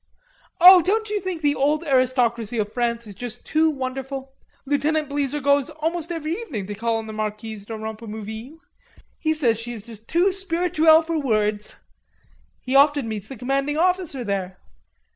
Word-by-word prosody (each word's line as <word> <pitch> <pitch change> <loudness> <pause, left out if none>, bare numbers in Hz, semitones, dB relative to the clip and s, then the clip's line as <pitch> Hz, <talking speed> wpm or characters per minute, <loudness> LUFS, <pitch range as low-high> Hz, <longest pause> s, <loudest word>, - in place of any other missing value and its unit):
"Oh, 360 +1 +10
don't 425 +5 0
you 420 - 0
think 360 -4 -5
the 290 -1 +3
old 295 +3 +1
aristocracy 250 -5 +1
of 210 -1 -2
France 235 -1 -1
is 205 - -10
just 240 +3 -7
too 315 0 +2
wonderful? 265 -1 -5 0.3
Lieutenant 295 +2 0
Bleezer 285 0 -1
goes 280 -1 +2
almost 325 +2 -3
every 325 -1 -3
evening 315 - -5
to 205 - -5
call 230 +2 -1
on 225 - -5
the 220 - -7
Marquise 215 -1 -5
de 225 - -6
Rompemouville. 220 +4 -7 0.6
He 315 -1 0
says 235 -8 +1
she 240 +1 -6
is 220 -4 -8
just 225 -1 -13
too 355 +4 +3
spirituelle 335 -4 +3
for 325 0 -2
words.... 215 -5 -1 0.9
He 260 +1 -3
often 285 -2 +4
meets 215 -3 -5
the 270 - -9
Commanding 275 +4 -1
Officer 360 -6 0
there." 190 -3 -3
270 Hz, 165 wpm, -23 LUFS, 225-315 Hz, 0.9 s, Oh